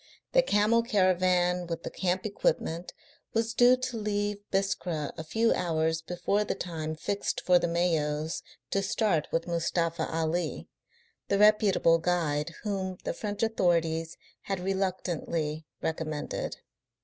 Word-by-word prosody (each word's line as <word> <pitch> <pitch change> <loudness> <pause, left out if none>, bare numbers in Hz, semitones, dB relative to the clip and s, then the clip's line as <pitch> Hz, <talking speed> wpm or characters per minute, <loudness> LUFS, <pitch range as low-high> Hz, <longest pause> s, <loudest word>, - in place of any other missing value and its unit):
The - - +6
camel 225 - +3
caravan 185 -4 +2
with 165 -1 -4
the - - -5
camp 185 +1 -1
equipment 175 -4 -1 0.4
was 225 0 +1
due 245 +2 +6
to 255 -2 -3
leave 205 -1 -1
Biskra 180 -6 -1
a 160 - -6
few 225 +8 +2
hours 160 -1 0
before 180 +5 0
the - - -2
time 160 -3 -4
fixed 200 +5 -2
for 180 -1 +4
the - - 0
Mayos 160 -2 0 0.3
to 195 - +2
start 195 -5 +1
with 165 0 0
Mustafa 170 -1 0
Ali, 165 +2 -1 0.6
the 200 - +2
reputable 205 -5 +5
guide 165 -3 0
whom 190 -3 -2
the - - -2
French 205 0 -3
authorities 165 -6 +1 0.2
had 195 -1 -3
reluctantly 175 -5 -2 0.2
recommended. 155 -2 -3
180 Hz, 130 wpm, -29 LUFS, 165-205 Hz, 0.6 s, The